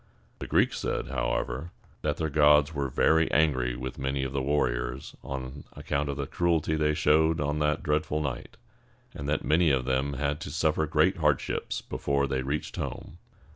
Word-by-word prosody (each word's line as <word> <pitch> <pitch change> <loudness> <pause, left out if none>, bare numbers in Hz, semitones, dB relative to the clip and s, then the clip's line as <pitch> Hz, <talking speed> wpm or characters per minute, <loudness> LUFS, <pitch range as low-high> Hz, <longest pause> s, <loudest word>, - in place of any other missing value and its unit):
The - - -6
Greeks - - +2
said, - - -2
however, 65 +8 -2 0.3
that 75 -1 -1
their 80 -2 -2
gods 75 +1 +5
were 70 -2 -2
very 80 +5 +3
angry 65 -6 +2
with 65 +1 -6
many 65 0 -1
of 65 0 -4
their 70 - 0
warriors 65 -2 -1
on 70 +1 -6
account 70 0 -2
of 70 - -3
the 70 - -2
cruelty 80 0 0
they 75 -1 +1
showed 80 +1 +3
on 75 +1 -1
that 75 0 0
dreadful 75 -1 0
night, 70 -5 -5 0.6
and 70 0 -5
that 75 - -1
many 80 +2 +4
of 65 -3 +1
them 65 +2 0
had 70 +2 -1
to - - -6
suffer 80 +1 +1
great 80 +5 +2
hardships 75 -4 0
before 70 0 -1
they 65 -1 -1
reached 70 +3 -3
home. - - -6
75 Hz, 175 wpm, -28 LUFS, 65-75 Hz, 0.6 s, gods